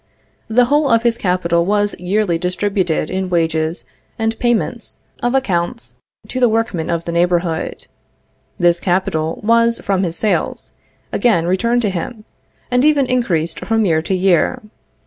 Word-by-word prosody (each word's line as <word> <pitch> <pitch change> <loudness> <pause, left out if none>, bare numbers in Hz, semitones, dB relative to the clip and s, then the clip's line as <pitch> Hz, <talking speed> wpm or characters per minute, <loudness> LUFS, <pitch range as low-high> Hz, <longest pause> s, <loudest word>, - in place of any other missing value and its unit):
The 240 +2 +3
whole 290 +2 +2
of 230 -1 +3
his 235 -1 +2
capital 180 -5 +1
was 205 +2 +1
yearly 180 -1 0
distributed 180 -2 -1
in 190 0 -2
wages 160 -5 -1 0.3
and 225 -1 -1
payments 235 -1 -1 0.2
of 245 +2 0
accounts 205 -3 -1 0.3
to 255 - -4
the 245 -2 +4
workmen 220 -7 -1
of 170 -1 -2
the 170 - -3
neighborhood. 170 -1 0 0.7
This 175 0 +3
capital 175 -4 -1
was, 230 +1 +3
from 195 -2 -1
his 170 -3 -2
sales, 210 +4 -1 0.4
again 215 -9 +2
returned 235 +7 +1
to 205 - +1
him, 210 +5 -5 0.5
and 250 +1 +3
even 295 -2 +4
increased 180 -11 -1
from 225 -1 0
year 160 -4 +2
to 190 +4 -1
year. 185 0 +2
190 Hz, 145 wpm, -18 LUFS, 170-230 Hz, 0.7 s, the